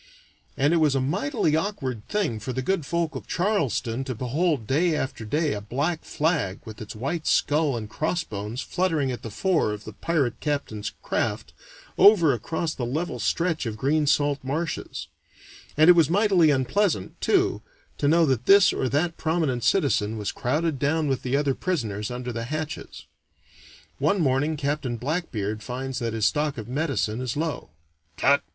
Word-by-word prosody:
And 145 +4 +3
it - - +4
was 150 -4 +3
a - - +2
mightily 145 +2 0
awkward 145 - -3
thing 195 - -1
for 120 +4 -5
the 130 - -2
good 180 -3 -1
folk 170 -1 -1
of 130 - -7
Charleston 135 - 0
to 130 -2 -4
behold 135 +2 0
day 155 +7 +2
after 130 -5 -3
day 150 +7 0
a 105 - -4
black 145 +10 -2
flag 150 - -1
with 110 -1 -9
its 110 - -7
white 140 +8 -3
skull 145 -3 +2
and 110 -2 -5
crossbones 110 - -3
fluttering 160 -8 0
at 125 - -5
the 115 - -6
fore 160 - +1
of 105 0 -6
the 110 - -9
pirate 140 0 -1
captain's 140 -8 -3
craft, - - -2 0.5
over 175 -9 +7
across 160 +7 -2
the 125 - -5
level 130 +2 -2
stretch 165 +4 0
of 110 -1 -4
green 145 +4 +1
salt 145 -1 +2
marshes; 155 +6 -3 0.7
and 155 +1 +6
it 180 - +10
was 165 -4 +4
mightily 190 -3 +4
unpleasant, 140 - 0
too, - - +2 0.4
to 145 - +1
know 165 +2 +5
that 130 -4 0
this 200 0 +7
or 130 - -1
that 165 +5 0
prominent 155 -7 0
citizen 115 - +2
was 105 -1 -2
crowded 150 +3 -1
down 155 +3 +1
with 135 -2 0
the 130 +2 0
other 145 -2 +1
prisoners 110 - -2
under 125 0 -5
the 115 0 -4
hatches. 155 +3 -5 0.9
One 160 +8 +2
morning 145 +1 +1
Captain 140 -4 -2
Blackbeard 115 - -3
finds 130 +3 -4
that 115 -2 -2
his 110 -2 0
stock 150 -2 +1
of 110 -2 -6
medicine 125 -5 -1
is 130 +1 -3
low. 160 0 -3 0.5
"Tut!" 140 +7 +4
140 Hz, 170 wpm, -25 LUFS, 120-160 Hz, 0.9 s, it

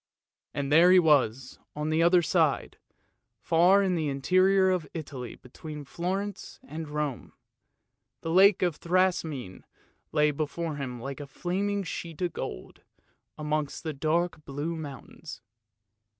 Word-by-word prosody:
And 140 -1 -2
there 170 +4 +7
he 185 - +7
was 135 -7 +2 0.2
on 150 +1 -2
the 160 +1 +2
other 175 +1 +5
side, - - +1 0.6
far 180 +4 +4
in 190 -2 +1
the 160 -3 -1
interior 185 +7 +3
of 180 -5 -1
Italy 135 -7 -6
between 150 +3 -10
Florence 190 +6 -4
and 160 -9 -7
Rome. 150 -4 -4 0.9
The 165 - -3
lake 190 +2 +6
of 175 -4 0
Thrasymene 165 - 0 0.5
lay 150 -1 +3
before 155 +1 -3
him 125 -4 -5
like 135 +4 -6
a 145 -1 -8 0.2
naming 200 +3 0
sheet 165 -3 -6
of 175 - -1
gold, - - -7 0.6
amidst 150 0 -2
the 160 -2 -3
dark 160 +3 -1
blue 145 +4 -4
mountains. 145 -5 -9
160 Hz, 135 wpm, -28 LUFS, 145-180 Hz, 0.9 s, there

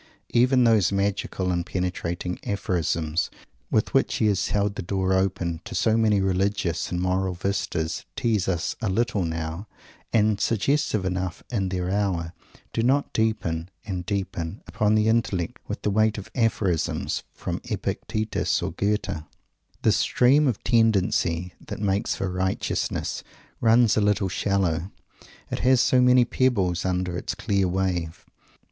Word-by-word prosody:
Even 125 +1 +4
those 110 -6 +4
magical 100 -2 -1
and 85 -1 0
penetrating 90 -1 -3
"aphorisms" 85 -4 -1 0.4
with - - +1
which - - +2
he - - +1
has 100 -2 +2
held 100 0 0
the 100 - -5
door 95 +1 0
open 90 -3 0
to 115 0 -7
so 110 -1 +3
many 110 -3 +3
religious 95 -2 0
and 90 - -1
moral 95 0 0
vistas 85 -3 -2
tease 110 -6 0
us 90 -3 -1
a 110 - 0
little 100 -1 +1
now, 80 +4 -4 0.4
and 105 -2 +2
suggestive 115 -2 +1
enough 95 -1 -3
in 100 -5 0
their 90 0 -2
hour 95 -5 -1 0.4
do - - 0
not 135 +4 +1
deepen 90 -7 -1 0.2
and 90 -3 -3
deepen 95 -2 -3
upon 105 0 +1
the 110 0 +3
intellect 105 -7 0
with - - -5
the 105 - +1
weight 110 +1 +2
of 100 - -8
"aphorisms" 105 - 0
from - - -5
Epictetus 110 -1 -1
or - - -2
Goethe. 100 -4 -1 0.6
The - - +5
"stream 140 +4 +4
of 120 -6 -1
tendency 100 -6 +2
that - - -5
makes 100 -1 0
for 95 -1 -2
righteousness" 95 +1 -2 0.4
runs 115 0 +4
a 110 - +2
little 100 -2 +2
shallow, 90 -3 0 0.4
and - - -21 0.2
it - - -2
has 130 0 +4
so 125 +1 +4
many 125 -1 +6
pebbles 100 -10 +1
under 90 -1 -1
its 90 - -3
clear 100 -2 +1
wave! 90 -3 -2
95 Hz, 150 wpm, -25 LUFS, 90-110 Hz, 0.6 s, many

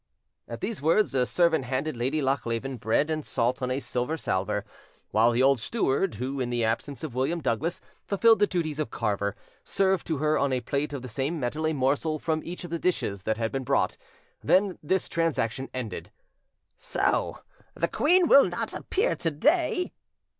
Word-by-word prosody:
At 115 - -7
these 210 -5 -3
words, 165 +4 +3
a 125 -2 +2
servant 170 -6 +2
handed 135 +4 -2
Lady 135 +6 -1
Lochleven 130 -1 -1
bread 115 +8 +1
and 155 -1 -2
salt 125 +1 0
on 125 - -1
a 130 +2 0
silver 125 +4 -2
salver, 105 -4 -1 0.5
while 110 +3 +4
the 120 +2 +2
old 135 -1 +4
steward, 190 - 0
who, 130 +5 -3
in 125 -2 -1
the 120 -2 0
absence 135 +6 -2
of 155 -6 -5
William 135 +7 0
Douglas, 145 +5 -1 0.2
fulfilled 225 +3 +4
the 205 - +4
duties 155 -5 -2
of 155 - -1
carver, 100 -2 -1 0.3
served 190 -2 +1
to 160 - -1
her 155 +2 +1
on 140 -1 +1
a 130 - +1
plate 140 +5 -2
of 140 -3 -5
the - - -6
same 135 +8 -2
metal 150 +5 -1
a 160 - 0
morsel 145 +3 +1
from 155 0 -1
each 175 +2 -7
of 175 - -8
the 170 - -2
dishes 105 - -1
that 110 0 0
had 115 -1 -1
been 135 -1 -2
brought; - - +1 0.5
then, 190 -1 +3
this 185 +5 0
transaction 135 -6 -1
ended. 125 -4 -5 0.7
"So - - 0 0.4
the - - 0
queen 350 +3 +3
will 280 - +7
not - - -4
appear 410 +6 0
to 165 - 0
day?" 315 - +1
140 Hz, 190 wpm, -27 LUFS, 125-170 Hz, 0.7 s, will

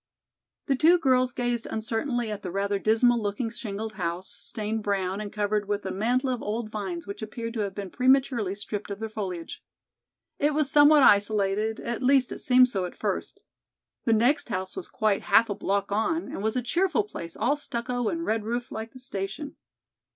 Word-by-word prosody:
The 275 - +2
two 325 +6 +5
girls 255 -5 +3
gazed 240 -1 -2
uncertainly 225 +1 -2
at 210 - -5
the 185 - -5
rather 200 +2 -1
dismal 230 +3 +3
looking 210 +3 -2
shingled 220 -2 -5
house, 175 -1 -3
stained 220 -1 -4
brown 195 -1 -1
and 205 -1 -6
covered 210 -1 -1
with 205 -1 -2
a 190 - -2
mantle 245 +6 +1
of 245 - -3
old 215 +1 -3
vines 190 -6 -4
which 200 +2 -7
appeared 230 +1 -5
to 230 - -4
have 200 -2 -2
been 195 -3 -6
prematurely 255 -6 +2
stripped 205 0 -5
of 200 0 -5
their 220 0 -4
foliage. 185 -6 -5 0.8
It 295 0 +2
was 300 -2 +1
somewhat 290 0 +7
isolated, 205 +1 +3
at 235 +1 -3
least 260 -1 +3
it - - -5
seemed 255 0 +5
so 195 -7 -2
at 180 - -8
first. - - -3 0.6
The 230 - +4
next 245 +6 +2
house 185 -3 -3
was 175 - -5
quite 215 -2 0
half 230 -2 +4
a - - +1
block 200 0 -1
on 225 +11 +1
and - - -5
was 220 +2 -1
a 250 - 0
cheerful 365 - +1
place, 170 - -8
all 280 +4 +2
stucco 245 -4 -3
and 335 0 -3
red 220 0 0
roof 240 +3 -3
like 220 +1 -6
the 260 - -11
station. 250 +3 -5
220 Hz, 195 wpm, -27 LUFS, 200-250 Hz, 0.8 s, somewhat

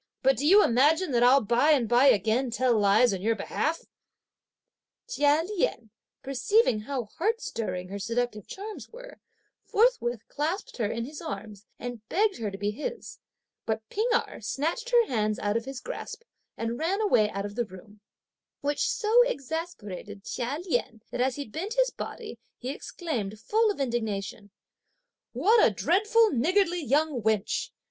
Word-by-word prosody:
but 270 +1 +4
do 290 - -1
you 405 +5 +7
imagine 300 +8 +3
that 240 -2 +2
I'll 255 +3 +6
by 240 +7 +2
and 255 -6 +2
by 245 +4 +4
again 225 +3 +3
tell 245 +1 +2
lies 210 +2 +4
on 185 - -4
your 225 +3 +1
behalf!" 320 +7 -2 1.2
Chia 295 -9 +2
Lien 290 - -2 0.3
perceiving 270 - +2
how 255 +3 -3 0.2
heart 445 +6 +1
stirring 185 - -4
her 200 +1 -5
seductive 230 0 -2
charms 420 +2 -8
were, - - -12 0.4
forthwith 410 - +1
clasped 325 +7 -3
her 225 -4 0
in 230 +2 -3
his 295 +3 -9
arms, 205 0 -7
and 245 -2 -6
begged 410 +2 +2
her 220 -3 -3
to 195 - -7
be 205 +1 -1
his; 485 - -6 0.5
but 220 0 -2
P'ing 440 +4 0
Erh 445 - -2
snatched 325 - -2
her 480 -2 +5
hands 215 - 0
out 205 0 -1
of 230 0 -1
his 270 -1 -6
grasp 480 - -7 0.3
and 230 +1 -3
ran 365 +6 0
away 235 - +3
out 200 0 -4
of 205 - -6
the 240 +2 -1
room; 205 +2 -14 0.6
which 290 0 0
so 470 0 +4
exasperated 260 - -5
Chia 250 +6 -3
Lien 235 - -2
that 245 - -2
as 260 0 +1
he 285 - -5
bent 370 - -5
his - - +3
body, 430 - -7 0.2
he 250 - -6
exclaimed, 265 - -5
full 435 - +2
of 405 - -3
indignation: 220 -5 -3 0.8
"What 410 - +4
a - - +6
dreadful 425 - +3
niggardly 350 - +1
young 290 -1 +1
wench! 215 -1 0
255 Hz, 165 wpm, -27 LUFS, -, 1.2 s, you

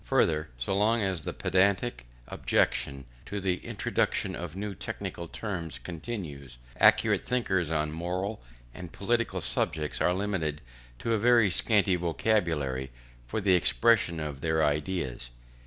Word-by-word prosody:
Further, 75 -2 +2
so - - -1
long 110 +3 +3
as 95 -5 0
the - - -2
pedantic 95 -10 +1 0.2
objection 70 -1 0 0.2
to 100 - -3
the 95 -2 0
introduction - - -1
of 85 -1 -6
new 100 +1 -4
technical 85 -1 -5
terms 85 -5 -5
continues, 80 - -7 0.2
accurate - - +5
thinkers 95 -10 0
on 75 -1 0
moral 90 +6 -3 0.3
and 90 -2 -9
political 115 +3 -1
subjects 75 -1 -1
are 90 - +3
limited 90 -7 -1 0.4
to 115 - -1
a 110 - +2
very 115 -3 +5
scanty 100 +1 +3
vocabulary 80 -7 0 0.4
for 60 - -2
the 95 -2 +3
expression 90 -1 +3
of 75 -3 -5
their 80 -1 +1
ideas. 75 -5 -2
90 Hz, 135 wpm, -29 LUFS, 75-100 Hz, 0.4 s, accurate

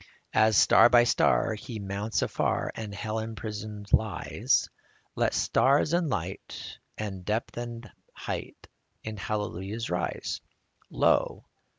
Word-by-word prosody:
As 110 -2 +4
star - - +7
by 120 -1 +7
star 120 -1 +3
He 115 +2 -7
mounts 100 +2 -2
afar, - - 0
And 110 -2 -6
hell 110 +2 -3
imprisoned 105 -1 -6
lies, 105 -6 +2 0.5
Let - - +1
stars 140 +4 +3
and 170 -2 +2
light 95 -6 -5 0.2
and 100 -4 -5
depth 105 +5 -2
and 120 0 -6 0.2
height - - -6 0.4
In 110 -1 -5
hallelujahs 105 +1 -3
rise. 90 -1 -2 0.5
Lo - - +2
110 Hz, 115 wpm, -28 LUFS, 100-115 Hz, 0.5 s, star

